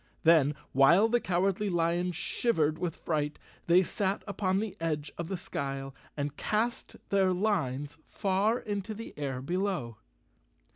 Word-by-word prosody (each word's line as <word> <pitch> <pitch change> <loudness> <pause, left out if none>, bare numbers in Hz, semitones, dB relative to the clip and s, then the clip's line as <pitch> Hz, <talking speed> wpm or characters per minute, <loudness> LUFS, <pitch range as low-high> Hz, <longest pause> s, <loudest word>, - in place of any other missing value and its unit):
Then, 155 -3 +5 0.2
while 165 - +6
the 240 +1 +3
Cowardly 195 +2 0
Lion 175 +1 +1
shivered 160 -2 0
with 175 -3 -2
fright, 150 -2 -2 0.3
they 175 +2 +6
sat 195 +2 -1
upon 195 -2 0
the 215 -2 -3
edge 155 -2 -2
of 170 - -4
the 190 +1 -3
skyle 135 -7 -4 0.2
and 145 0 -2
cast 225 +7 -1
their 195 -2 +3
lines 150 -7 -1
far 200 +3 +1
into 205 -1 -4
the 230 +2 -8
air 135 -3 -3
below. 175 - -2
175 Hz, 140 wpm, -30 LUFS, 150-200 Hz, 0.3 s, while